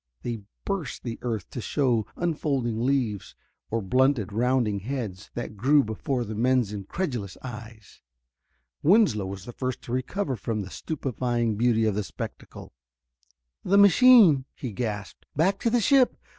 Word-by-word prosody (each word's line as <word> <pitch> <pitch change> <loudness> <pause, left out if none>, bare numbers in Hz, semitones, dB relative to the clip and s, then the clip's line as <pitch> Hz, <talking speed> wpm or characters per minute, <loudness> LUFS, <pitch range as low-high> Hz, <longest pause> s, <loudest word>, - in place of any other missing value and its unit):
They 115 -3 -4 0.2
burst 195 -9 -3
the 115 -2 -5
earth 115 -5 -3
to 125 - -5
show 120 -5 0
unfolding 140 -9 -1
leaves 125 -7 -1 0.3
or 115 -1 -1
blunted, 125 -1 +2
rounding 120 -2 +1
heads, 105 -4 -5
that 120 -3 -5
grew 140 +7 +4
before 120 +4 -2
the 110 - -6
men's 120 -1 +1
incredulous 105 - -4
eyes. 115 -3 -10 0.8
Winslow 165 - +4
was 95 0 -7
the 120 - -8
first 130 +1 -4
to - - -8
recover 130 +5 -2
from 110 0 -3
the 95 - -10
stupefying 120 -6 -2
beauty 115 0 +2
of 110 - +1
the 105 +1 -1
spectacle. - - -8 0.9
"The 200 - +3
machine!" 200 - +7
he 125 - -5
gasped. 105 -2 -5
"Back 190 +6 +2
to 230 - +1
the 240 +1 +2
ship! 260 +2 +4
120 Hz, 145 wpm, -26 LUFS, 110-140 Hz, 0.9 s, machine